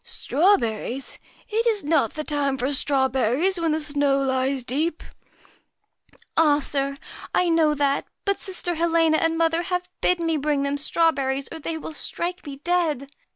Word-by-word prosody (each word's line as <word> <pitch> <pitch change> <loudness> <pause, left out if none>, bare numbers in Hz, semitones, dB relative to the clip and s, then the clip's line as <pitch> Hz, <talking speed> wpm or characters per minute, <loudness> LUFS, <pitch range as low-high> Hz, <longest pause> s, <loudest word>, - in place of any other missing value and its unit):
MAR - - -31
' - - -14
Strawberries! 265 - 0 0.3
It 455 +1 0
is 435 -3 +2
not 290 -7 +1
the 305 - -4
time 285 -3 0
for 260 +3 -1
strawberries 270 - +2
USCHKA - - -4
when 330 -1 +1
the 310 +1 0
snow 285 -2 +1
lies 265 -1 0
deep? 305 +7 -1 0.6
' - - -33
'Ah, 300 -3 +5
sir! 275 -1 0 0.4
I 360 - +3
know 320 -2 +3
that 280 -1 +1
well; - - -41
but 400 -1 0
sister 365 -2 +1
Helena 330 -1 +2
and 325 0 +1
mother 330 0 +2
have 360 0 -3
bidden 350 -2 +1
me 325 -1 +1
bring 290 -1 0
them 280 0 -1
straw 330 +3 +2
berries, 270 -1 -2
or 325 - -7
they 320 +1 -4
will 315 - -7
strike 355 +4 -4
me 280 - -6
dead. 300 -3 -1
300 Hz, 185 wpm, -23 LUFS, 275-335 Hz, 0.6 s, Ah